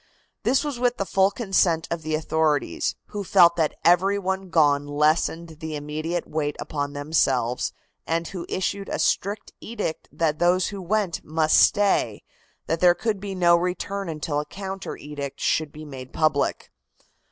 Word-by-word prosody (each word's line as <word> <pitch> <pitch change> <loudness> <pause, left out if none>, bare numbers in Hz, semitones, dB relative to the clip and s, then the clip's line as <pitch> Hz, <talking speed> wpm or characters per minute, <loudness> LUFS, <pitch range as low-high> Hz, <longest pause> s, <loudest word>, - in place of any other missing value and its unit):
This 270 +2 +2
was 290 -5 -4
with 245 0 +1
the 195 - -1
full 190 0 +3
consent 190 -6 +1
of 170 -1 -2
the 155 0 -1
authorities, 155 -1 0
who 205 -1 -4
felt 170 -2 +6
that 160 -3 +1
every 185 +4 +4
one 190 -1 -3
gone 145 -3 +3
lessened 155 +2 0
the 160 -1 -5
immediate 155 +4 -3
weight 150 -1 -2
upon 145 -2 -3
themselves, 135 -5 0 0.4
and 165 0 -1
who 180 -3 -6
issued 195 +1 -2
a - - -2
strict 205 +2 -1
edict 210 -8 -4
that 155 -2 0
those 180 +1 +3
who 200 -2 -6
went 195 -1 -1
must 155 0 +2
stay, 195 - +2 0.4
that 165 +1 -1
there 175 0 +5
could 210 +3 -1
be 195 -1 -5
no 175 -2 +5
return 180 +2 -2
until 150 -1 -2
a 150 - -3
counter 195 0 -6
edict 140 -1 -7
should 155 -2 0
be 155 +1 -10
made 130 -3 -9
public. 155 -2 0
165 Hz, 165 wpm, -24 LUFS, 150-190 Hz, 0.4 s, felt